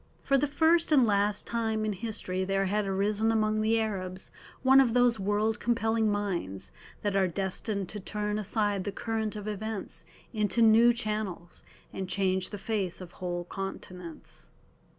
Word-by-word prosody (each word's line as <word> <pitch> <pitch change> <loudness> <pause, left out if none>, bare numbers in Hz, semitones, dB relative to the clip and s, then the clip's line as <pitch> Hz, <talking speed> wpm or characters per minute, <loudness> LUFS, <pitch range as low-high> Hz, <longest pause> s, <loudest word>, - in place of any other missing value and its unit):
For 275 - +2
the 280 +2 +3
first 320 +3 +3
and 270 -5 +6
last 205 -1 +1
time 220 -2 -1
in 215 - 0
history 190 -3 -3
there 195 +1 0
had 205 +1 0
arisen 205 +3 +1
among 215 -1 +1
the 225 +1 +2
Arabs 190 -4 -3 0.3
one 265 +1 +7
of 245 -3 +3
those 245 -3 +4
world 210 +3 0
compelling 225 -2 +1
minds 170 - -3 0.3
that 205 -1 0
are 195 -1 +3
destined 195 +2 -2
to 210 - -4
turn 210 +1 -2
aside 205 -1 0
the 205 - -3
current 220 +1 -3
of 210 0 -6
events 210 -4 -4 0.3
into 215 +1 +2
new 225 +2 +7
channels, 215 -7 -4 0.3
and 190 -1 -4
change 190 -1 +1
the 205 - -6
face 200 -4 -2
of 180 -2 -9
whole 175 -2 -4
continents. 180 -2 -8
210 Hz, 160 wpm, -29 LUFS, 190-225 Hz, 0.3 s, one